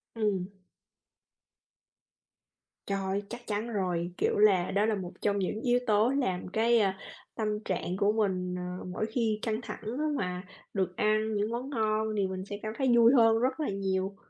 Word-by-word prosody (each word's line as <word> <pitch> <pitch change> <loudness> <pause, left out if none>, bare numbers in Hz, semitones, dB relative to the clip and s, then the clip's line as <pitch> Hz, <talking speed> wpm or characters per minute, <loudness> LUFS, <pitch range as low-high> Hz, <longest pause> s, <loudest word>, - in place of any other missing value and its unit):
Ừm. 200 -5 0 2.4
Trời, 195 0 -1
chắc 240 +1 -7
chắn 215 +2 -2
rồi, 180 -3 -1
kiểu - - +1
là, 195 -4 +4
đó 205 +2 +2
là 220 -1 +1
một 185 -2 -5
trong 205 -1 +1
những 210 +4 -2
yếu 245 0 +3
tố 215 +2 +4
làm 220 -11 -1
cái, 230 +4 +3
a, 195 -2 +1 0.4
tâm 215 -1 -1 0.2
trạng 185 0 -2
của 205 0 +3
mình, 185 -4 0 0.2
ờ, - - -8
mỗi 185 +4 -2
khi 220 -1 0
căng 220 0 -1
thẳng - - -7 0.2
á 310 - 0
mà 180 -1 -3 0.3
được 185 -2 -1
ăn 215 +1 +2
những 205 +2 0
món 250 +4 -3
ngon, 220 -3 0
thì 195 - +2
mình 185 0 -5
sẽ 205 0 -6
cảm 215 - -3
thấy 265 - +1
vui 235 +2 +7
hơn 225 -3 +5
rất 260 +3 0
là 305 - -1
nhiều. 195 0 -1
210 Hz, 180 wpm, -29 LUFS, 190-225 Hz, 2.4 s, vui